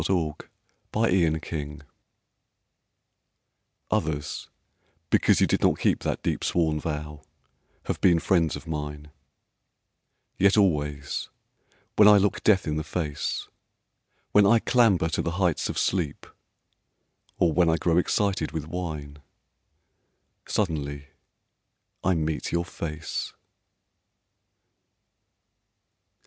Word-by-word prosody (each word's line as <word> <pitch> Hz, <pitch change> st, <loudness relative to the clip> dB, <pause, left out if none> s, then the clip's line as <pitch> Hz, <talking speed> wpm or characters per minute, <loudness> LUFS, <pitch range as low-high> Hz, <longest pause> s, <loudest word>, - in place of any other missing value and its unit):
A -, -, -2 dB
DEEP 80 Hz, -4 st, -2 dB, 0.4 s
SWORN 90 Hz, -8 st, +2 dB
VOW 75 Hz, -2 st, -6 dB, 2.1 s
Others 75 Hz, -1 st, -2 dB, 0.6 s
because -, -, +4 dB
you -, -, +5 dB
did -, -, 0 dB
not -, -, +3 dB
keep -, -, +1 dB
That -, -, -3 dB
deep -, -, -1 dB
sworn 80 Hz, -3 st, +1 dB
vow 75 Hz, -1 st, -5 dB, 0.6 s
have -, -, -4 dB
been 85 Hz, -3 st, +5 dB
friends 80 Hz, -2 st, +1 dB
of -, -, -9 dB
mine; 75 Hz, -1 st, -5 dB, 1.3 s
Yet 100 Hz, +2 st, +4 dB
always 75 Hz, -7 st, 0 dB, 0.7 s
when 105 Hz, -, +8 dB
I 105 Hz, -1 st, +8 dB
look 100 Hz, +1 st, +1 dB
death 100 Hz, -4 st, +3 dB
in 75 Hz, -1 st, -1 dB
the 80 Hz, -, -2 dB
face, 75 Hz, -2 st, -3 dB, 0.8 s
When 105 Hz, -1 st, +5 dB
I 115 Hz, -, +6 dB
clamber 110 Hz, -8 st, +3 dB
to -, -, -1 dB
the 85 Hz, -, -3 dB
heights 90 Hz, -5 st, +1 dB
of -, -, -4 dB
sleep, 85 Hz, -6 st, -1 dB, 1.1 s
Or 85 Hz, -3 st, +2 dB
when 85 Hz, -1 st, +3 dB
I 80 Hz, -, +2 dB
grow 85 Hz, +1 st, +2 dB
excited 95 Hz, -3 st, 0 dB
with 80 Hz, -2 st, -3 dB
wine, 75 Hz, -4 st, -5 dB, 1.3 s
Suddenly 70 Hz, -7 st, -2 dB, 0.9 s
I 95 Hz, -1 st, +2 dB
meet 80 Hz, -1 st, -2 dB
your 85 Hz, 0 st, 0 dB
face. 80 Hz, -2 st, -5 dB
80 Hz, 110 wpm, -26 LUFS, 75-90 Hz, 2.1 s, when